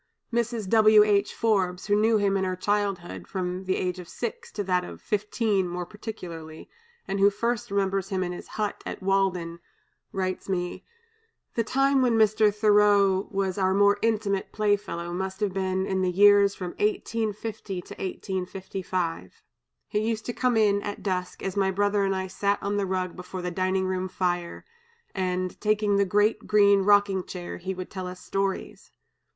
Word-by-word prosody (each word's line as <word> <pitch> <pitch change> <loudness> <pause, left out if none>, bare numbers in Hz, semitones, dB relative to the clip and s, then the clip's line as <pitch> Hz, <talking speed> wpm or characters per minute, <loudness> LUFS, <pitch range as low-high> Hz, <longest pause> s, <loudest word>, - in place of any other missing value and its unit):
Mrs. 235 -3 -1
W. 215 0 +6
H. 205 -1 +2
Forbes, 190 -5 +1
who 205 - +2
knew 220 +1 +3
him 200 -1 +1
in 195 - +1
her 185 -1 -1
childhood, 185 - -2
from 185 0 -3
the 185 - +1
age 180 0 -2
of 175 - -10
six 235 -2 -5
to 205 - -2
that 180 -1 +1
of - - -9
fifteen 210 -2 0
more 175 0 -4
particularly, 170 -7 -8 0.4
and 195 0 -2
who 200 +1 +6
first 235 +3 -2
remembers 195 -1 0
him 190 -2 -1
in 180 - -3
his 175 - -8
hut 210 -1 -2
at - - -6
Walden, 185 -3 0 0.5
writes 185 0 -3
me: 180 -2 -2 0.7
"The 230 - +1
time 270 +3 +2
when 240 -3 +3
Mr. 215 -1 +4
Thoreau 205 -2 +4
was 195 -1 -1
our 190 0 +2
more 205 0 +4
intimate 210 -3 0
playfellow 205 -5 -1
must 190 +1 -4
have 205 -3 -1
been 190 0 -1
in 190 -1 -1
the 185 - +1
years 200 +1 +5
from 180 -2 -5
1850 220 - -2
to - - -10
1855. 185 - -4 0.4
He 210 - -1
used 220 0 -2
to 240 - -3
come 250 -2 +1
in, 205 -2 +3
at 205 0 -6
dusk, 180 -2 -3
as 195 0 -3
my 195 -1 +2
brother 205 +1 +1
and 195 0 +1
I 190 0 -2
sat 200 +2 0
on 200 +1 -1
the 200 -1 0
rug 185 -1 -2
before 180 0 -7
the 180 - -2
dining 185 +1 0
room 185 0 -1
fire, 175 -2 -2 0.5
and, 185 -1 -2
taking 210 -1 +2
the 200 - +3
great 210 +3 +1
green 200 -1 +5
rocking 200 -1 +3
chair, 175 -1 -7
he 190 +2 -4
would 185 0 -7
tell 185 -2 -5
us 180 0 -8
stories. 195 0 -3
195 Hz, 175 wpm, -26 LUFS, 185-210 Hz, 0.7 s, W